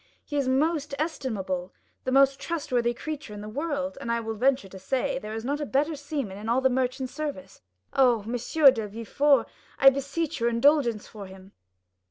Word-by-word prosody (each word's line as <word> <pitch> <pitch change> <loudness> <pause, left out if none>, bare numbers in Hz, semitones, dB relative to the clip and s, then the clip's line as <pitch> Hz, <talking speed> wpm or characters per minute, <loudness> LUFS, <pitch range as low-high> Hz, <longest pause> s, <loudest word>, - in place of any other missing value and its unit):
He 290 - -6
is 280 -2 +1
the 260 - +1
most 295 +1 0
estimable, 205 - -3 0.3
the 260 - -1
most 275 0 +4
trustworthy 250 -8 -1
creature 285 -3 -6
in 205 - -7
the 210 - -7
world, 280 +3 -3
and 235 - -3
I 235 - +1
will 225 -1 -4
venture 255 0 +1
to 190 0 -11
say, 265 +6 -1
there 215 -3 -6
is 225 +1 -5
not 290 +3 -1
a - - 0
better 295 +5 +1
seaman 280 -9 -4
in 215 +2 -5
all 240 +3 +3
the 265 0 +2
merchant 255 0 -1
service. 290 -3 -6 0.3
Oh, 245 -5 +4
M. 225 - -6
de 245 -2 +4
Villefort, 230 +7 +2 0.3
I 270 0 +8
beseech 280 +3 -3
your 235 0 +2
indulgence 235 -2 +2
for 205 -3 -9
him." 190 +1 -14
260 Hz, 195 wpm, -26 LUFS, 225-285 Hz, 0.3 s, I